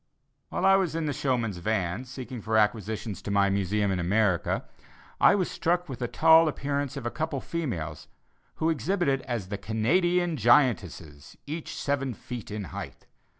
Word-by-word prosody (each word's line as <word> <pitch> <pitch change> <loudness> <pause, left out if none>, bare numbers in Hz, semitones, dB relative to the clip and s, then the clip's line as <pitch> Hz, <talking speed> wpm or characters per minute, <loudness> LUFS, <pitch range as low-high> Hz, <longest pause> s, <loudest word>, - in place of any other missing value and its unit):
While 195 0 +4
in 165 -3 -2
the 145 - -1
showmen's 120 -9 -1
vans 100 +4 -2
seeking 125 -2 -7
for 110 +1 0
acquisitions 105 -1 0
to - - -6
my 100 -1 +3
Museum 100 +1 0
in 95 - -1
America, 95 0 +1 0.5
I - - +6
was 185 -3 +1
struck 175 +1 0
with 130 -5 -7
the 120 - -1
tall 160 +4 +6
appearance 140 -1 -2
of 130 - -6
a 120 - -1
couple 160 -2 -2
of - - -6
females 90 - -4 0.5
who 160 +1 +1
exhibited 150 - 0
as 115 -7 -3
the 100 0 -4
"Canadian 170 - +1
giantesses, 105 - +1
each 155 +2 -5
seven 135 -3 -1
feet 120 -1 -8
in 105 0 -4
height." - - -8
120 Hz, 160 wpm, -27 LUFS, 105-155 Hz, 0.5 s, I